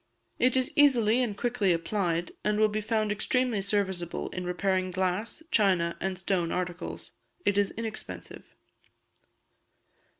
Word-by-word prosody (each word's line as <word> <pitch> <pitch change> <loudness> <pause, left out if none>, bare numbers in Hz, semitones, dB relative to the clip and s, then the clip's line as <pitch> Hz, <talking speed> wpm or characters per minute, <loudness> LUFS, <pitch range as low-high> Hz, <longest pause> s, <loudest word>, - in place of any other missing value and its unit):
It 255 +1 +3
is 260 0 +1
easily 250 -5 +5
and 215 -5 -1
quickly 235 -5 +1
applied, 170 0 0
and 210 0 +1
will 215 - +6
be 215 +1 -2
found 215 -1 0
extremely 230 +1 +1
serviceable 190 -4 -1
in 180 -1 -5
repairing 185 +1 0
glass, 190 - -2
china, 185 -6 +3
and 190 -1 -2
stone 180 -2 0
articles. 180 -1 -4 0.3
It 205 - +3
is 205 -1 +3
inexpensive. 225 -1 -7
200 Hz, 130 wpm, -28 LUFS, 180-220 Hz, 0.3 s, will